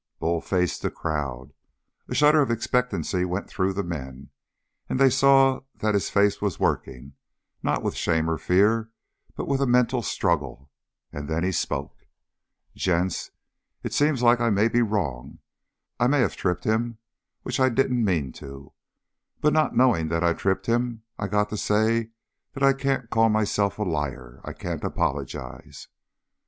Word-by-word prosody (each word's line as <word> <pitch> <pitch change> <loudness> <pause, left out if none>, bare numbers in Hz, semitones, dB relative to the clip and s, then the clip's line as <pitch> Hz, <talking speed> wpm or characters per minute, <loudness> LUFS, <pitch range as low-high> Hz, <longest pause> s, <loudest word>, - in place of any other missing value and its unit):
Bull 85 0 -1
faced 90 -2 -1
the - - -1
crowd. 70 -4 -4 0.5
A - - -4
shudder 150 +1 +5
of 135 - +1
expectancy 115 -5 0
went 90 +2 -3
through 95 0 -1
them, 95 -2 -3
and 65 -2 -8 0.6
then - - -2
they 135 0 +5
saw 135 0 +5 0.2
that 110 0 0
his 100 - 0
face 100 0 +2
was 100 -2 -2
working, 70 +1 -2 0.5
not - - -1
with - - -1
shame 80 0 0
or 80 -1 -1
fear 110 +5 +2 0.5
but - - -5
with 140 -1 0
a 135 - +2
mental 125 0 +2
struggle, 70 - -2 0.4
and 75 +1 -6
then 80 +1 -1
he 95 - +1
spoke. 85 - -3 0.8
"Gents, 90 0 -1 0.5
it - - -4
seems 145 -4 +2
like 120 0 +5
I 120 - +2
may 105 +2 +3
be 120 +1 +2
wrong. 80 - -2 0.6
I 125 - +3
may 140 +1 +3
have - - 0
tripped 90 -2 -1
him 110 +1 0 0.5
which 125 - -3
I 130 0 +4
didn't 125 -1 +1
mean 80 -10 0
to. 70 +1 -11 0.7
But 150 - +2
not 155 -1 +2
knowing 120 -11 +3
that 85 +1 -1
I 85 -1 +3
tripped 95 +2 -1
him, 120 -1 -1 0.2
I 105 - -2
got 105 0 +1
to 105 - -4
say 110 +2 +1 0.4
that 135 - -4
I 135 0 +6
can't 135 -3 -2
call 115 0 +4
myself 105 -2 +1
a 105 - -1
liar. 65 -8 -4
I - - -6
can't - - -5
apologize." - - -4
105 Hz, 165 wpm, -25 LUFS, 80-120 Hz, 0.8 s, I